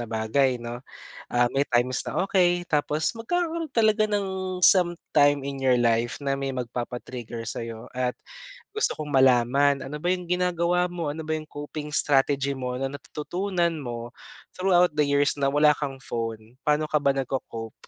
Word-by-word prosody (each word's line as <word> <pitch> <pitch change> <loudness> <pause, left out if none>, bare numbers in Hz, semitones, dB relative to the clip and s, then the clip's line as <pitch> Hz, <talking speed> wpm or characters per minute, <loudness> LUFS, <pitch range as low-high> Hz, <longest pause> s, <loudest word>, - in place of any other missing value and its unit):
na 120 - -3
bagay, 120 +4 +1
'no. 120 +1 -6 0.5
Ah, 120 0 +3
may 140 +1 +2
times 125 +1 +1
na - - 0
okay, 175 -2 +2
tapos 150 +7 0
magkakaroon 330 +7 -2
talaga 215 -1 +3
ng 190 -3 -2
sometime 155 -6 +4
in 140 -1 -5
your 130 -1 +4
life 115 +1 +1
na 135 0 0
may 135 0 -2
magpapa-trigger 120 -1 -5
sa'yo. 115 0 -6
At 125 -1 -1 0.6
gusto 435 - +1
kong 150 -1 -5
malaman, 135 +2 +4
ano 145 +3 -6
ba 175 +3 0
'yong 180 -2 -2
ginagawa 180 0 +1
mo? 170 -3 -3
Ano 160 +1 -6
ba 160 - -4
'yong 155 0 -6
coping 145 +1 -7
strategy 140 0 +3
mo 125 -1 -4
natututunan 170 +6 -2
mo 120 -2 -6 0.4
throughout 180 -2 +3
the 150 - +3
years 140 +1 +2
na 140 - +2
wala 150 +1 +5
kang 135 -2 -5
phone? 115 -1 -5
Paano 150 +1 +3
ka 150 - +1
ba 140 -1 +3
nagco-cope? 125 -4 -5
145 Hz, 160 wpm, -25 LUFS, 125-175 Hz, 0.6 s, wala